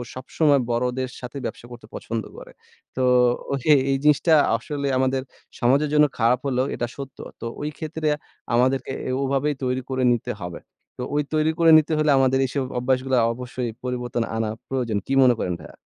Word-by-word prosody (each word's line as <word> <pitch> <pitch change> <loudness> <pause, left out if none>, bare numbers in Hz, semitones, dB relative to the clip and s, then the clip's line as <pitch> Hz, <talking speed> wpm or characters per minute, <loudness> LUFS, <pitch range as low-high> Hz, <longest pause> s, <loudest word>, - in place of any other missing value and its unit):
সবসময় 140 +2 +2
বড়দের 125 +2 -1
সাথে 125 +2 -7
ব্যবসা - - -6
করতে 120 -3 -11
পছন্দ 115 -2 -4
করে। - - -11 0.4
তো 130 - -2 0.9
এই - - +1
জিনিসটা 150 +2 +4 0.2
আসলে 140 +4 -3
আমাদের 130 0 +1 0.4
সমাজের 140 +5 +3
জন্য 150 0 +6
খারাপ 120 +2 +3
হলেও 130 -1 +1
এটা 120 - -2
সত্য। 135 -1 -8 0.2
তো - - -5
ঐ - - -6 0.2
ক্ষেত্রে 155 0 -3 0.5
আমাদেরকে 130 +2 +1 0.3
ওভাবেই 140 +2 0
তৈরি 130 0 0
করে 130 -1 -1
নিতে 120 - -3
হবে। 85 -1 -6 0.4
তো - - -6
ঐ - - -1 0.2
তৈরি 155 0 +2
করে 165 -1 +6
নিতে 155 0 +1
হলে 155 -1 +3
আমাদের 130 0 +3
এইসব 135 +1 -2 0.2
অভ্যাসগুলো 130 +1 0 0.2
অবশ্যই 125 0 -5
পরিবর্তন 125 -2 -2
আনা 110 -1 -1 0.2
প্রয়োজন। 125 -5 -1
কী 135 - -1
মনে 125 -1 +5
করেন 90 - -1
ভাইয়া? 85 - -13
130 Hz, 165 wpm, -23 LUFS, 120-140 Hz, 0.9 s, জন্য